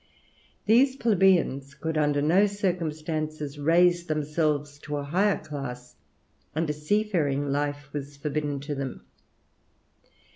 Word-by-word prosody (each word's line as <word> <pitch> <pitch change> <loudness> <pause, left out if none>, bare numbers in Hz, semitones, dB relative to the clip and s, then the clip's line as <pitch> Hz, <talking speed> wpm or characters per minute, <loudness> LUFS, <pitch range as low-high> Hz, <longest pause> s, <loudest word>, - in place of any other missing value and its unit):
These 255 +5 +5
plebeians 185 - +2
could 160 0 -3
under 145 -1 +2
no 185 +7 +4
circumstances 155 -6 -3
raise 175 +3 +3
themselves 150 -1 -1
to 150 0 -4
a 145 - -3
higher 190 +8 +2
class; 135 -5 -7 0.6
and 160 +1 0
a - - -2
seafaring 150 -5 0
life 145 0 -2
was 145 -1 -6
forbidden 145 -1 -2
to 145 +1 -4
them. 135 -2 -5
150 Hz, 115 wpm, -27 LUFS, 145-175 Hz, 0.6 s, These